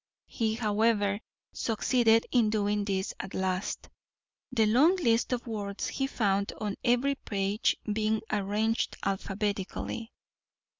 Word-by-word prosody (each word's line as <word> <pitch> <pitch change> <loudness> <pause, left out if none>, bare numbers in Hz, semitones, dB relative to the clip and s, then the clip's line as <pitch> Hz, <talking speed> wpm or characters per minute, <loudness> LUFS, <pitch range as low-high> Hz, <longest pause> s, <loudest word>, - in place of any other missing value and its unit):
He, 220 -2 -1
however, 210 -2 +1 0.3
succeeded 230 0 +2
in 235 -4 +4
doing 210 -1 0
this 195 -1 -1
at 190 - -6
last, 190 +1 -2 0.6
the 230 -3 +3
long 270 - +5
list 235 -11 +2
of 250 0 -1
words 205 -3 -3
he 270 - -1
found 200 -5 0
on 210 -2 -3
every 245 +3 +3
page 200 -5 0 0.2
being 215 0 0
arranged 210 +2 0
alphabetically. 200 +3 -3
215 Hz, 115 wpm, -29 LUFS, 200-230 Hz, 0.6 s, long